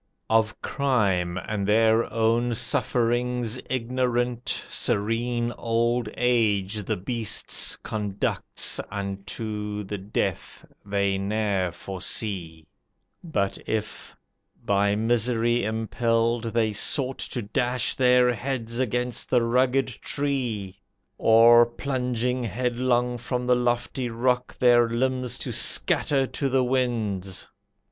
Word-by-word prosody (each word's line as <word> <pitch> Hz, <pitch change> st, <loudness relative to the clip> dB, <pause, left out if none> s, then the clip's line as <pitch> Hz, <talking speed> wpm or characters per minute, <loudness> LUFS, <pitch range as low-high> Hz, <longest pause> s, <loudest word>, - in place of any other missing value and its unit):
"Of 110 Hz, -1 st, +2 dB
crime, 100 Hz, -11 st, 0 dB
and 100 Hz, +2 st, -3 dB
their 110 Hz, +2 st, +3 dB
own 115 Hz, +1 st, +1 dB
sufferings 120 Hz, +1 st, 0 dB
ignorant, 125 Hz, -1 st, -1 dB
Serene 120 Hz, +3 st, -1 dB
old 115 Hz, 0 st, 0 dB
age 110 Hz, -4 st, +1 dB
the -, -, -1 dB
beasts 115 Hz, +3 st, -1 dB
conducts 105 Hz, -2 st, -2 dB
Unto 105 Hz, +1 st, -4 dB
the 100 Hz, 0 st, -5 dB
death 100 Hz, +2 st, -3 dB, 0.2 s
they 100 Hz, -1 st, 0 dB
ne'er 100 Hz, -2 st, 0 dB
foresee. 90 Hz, -3 st, -4 dB, 0.6 s
But 100 Hz, -, -1 dB
if, 105 Hz, -1 st, -4 dB, 0.5 s
by 100 Hz, -1 st, +2 dB
misery 120 Hz, +1 st, +1 dB
impelled, 115 Hz, +2 st, 0 dB
they 115 Hz, -1 st, 0 dB
sought 130 Hz, +5 st, 0 dB
To 120 Hz, -, -3 dB
dash 125 Hz, +3 st, 0 dB
their 125 Hz, -1 st, +4 dB
heads 120 Hz, -1 st, -3 dB
against 125 Hz, 0 st, -1 dB
the 125 Hz, -2 st, +3 dB
rugged 125 Hz, +3 st, +2 dB
tree, 120 Hz, -8 st, -3 dB, 0.4 s
Or, 115 Hz, +1 st, +7 dB
plunging 125 Hz, -1 st, -2 dB
headlong 125 Hz, +2 st, 0 dB
from 125 Hz, +1 st, -3 dB
the 125 Hz, 0 st, +4 dB
lofty 120 Hz, +1 st, -1 dB
rock, 125 Hz, +2 st, -1 dB
Their 120 Hz, -2 st, +5 dB
limbs 125 Hz, +1 st, -1 dB
to -, -, -4 dB
scatter 135 Hz, -2 st, +2 dB
to 135 Hz, +1 st, -2 dB
the 130 Hz, 0 st, +2 dB
winds. 110 Hz, -7 st, -1 dB
115 Hz, 105 wpm, -25 LUFS, 105-125 Hz, 0.6 s, Or